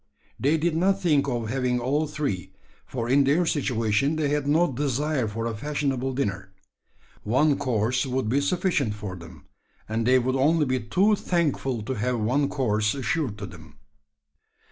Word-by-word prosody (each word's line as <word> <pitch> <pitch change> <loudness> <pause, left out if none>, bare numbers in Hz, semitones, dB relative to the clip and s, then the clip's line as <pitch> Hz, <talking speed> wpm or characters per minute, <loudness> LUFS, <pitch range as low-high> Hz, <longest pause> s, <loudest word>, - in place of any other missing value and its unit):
They 145 +5 +2
did 160 +1 0
not 190 +4 +2
think 150 -7 +2
of 120 -4 -2
having 125 -1 0
all 145 +6 0
three: 140 - -3 0.3
for 120 -3 -4
in 140 +3 +4
their 150 +6 +2
situation 130 -2 +1
they 155 -2 0
had 145 -1 -1
no 160 +2 +3
desire 140 0 -1
for 115 +2 -4
a 115 -1 -2
fashionable 135 0 -2
dinner. 100 -7 -3 0.7
One 140 +7 +2
course 125 -1 0
would 130 -2 -1
be 135 +6 +2
sufficient 140 - 0
for 105 -3 -6
them; 85 -4 -13 0.4
and 115 +1 -1
they 130 +1 +6
would 130 +1 0
only 150 +4 +3
be 130 -1 0
too 190 - +2
thankful 145 - -1
to 130 - -3
have 125 +1 -1
one 135 +6 +1
course 105 -4 0
assured 135 -4 -2
to 105 - -6
them. 80 -6 -13
130 Hz, 165 wpm, -25 LUFS, 115-150 Hz, 0.7 s, they